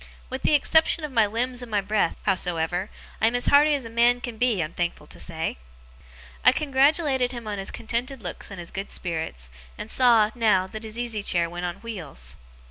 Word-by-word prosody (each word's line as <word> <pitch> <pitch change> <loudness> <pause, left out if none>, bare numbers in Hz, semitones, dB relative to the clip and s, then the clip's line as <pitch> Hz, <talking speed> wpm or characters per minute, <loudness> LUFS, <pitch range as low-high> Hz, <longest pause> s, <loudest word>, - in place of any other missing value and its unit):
With 260 0 -4
the 300 - +3
exception 320 +2 +3
of 300 - -4
my 225 -4 +3
limbs 245 +4 -2
and 245 - -8
my 210 -2 +1
breath, 200 -3 0
howsoever, 180 -1 0 0.3
I 220 - +5
am 235 - +1
as 245 - +2
hearty 295 +1 +5
as 270 -4 -4
a - - -7
man 240 +1 +4
can 240 -3 -7
be, 240 -5 +2
I'm 155 +2 -6
thankful 175 -1 -2
to - - -12
say.' 160 - -3 0.9
I - - +8
congratulated 275 -2 +2
him 235 -2 -7
on 205 -1 -3
his 195 - -3
contented 240 +2 -4
looks 175 - -6
and 195 - -8
his 170 - -8
good 195 +1 -5
spirits, 160 - -4 0.3
and 220 - -7
saw, 230 -4 +5
now, 215 -6 +3
that 215 +4 -8
his 220 +1 -6
easy 235 -3 -2
chair 175 -4 +2
went 175 +1 -3
on 175 - -4
wheels. 155 - -7
220 Hz, 210 wpm, -25 LUFS, 180-245 Hz, 0.9 s, I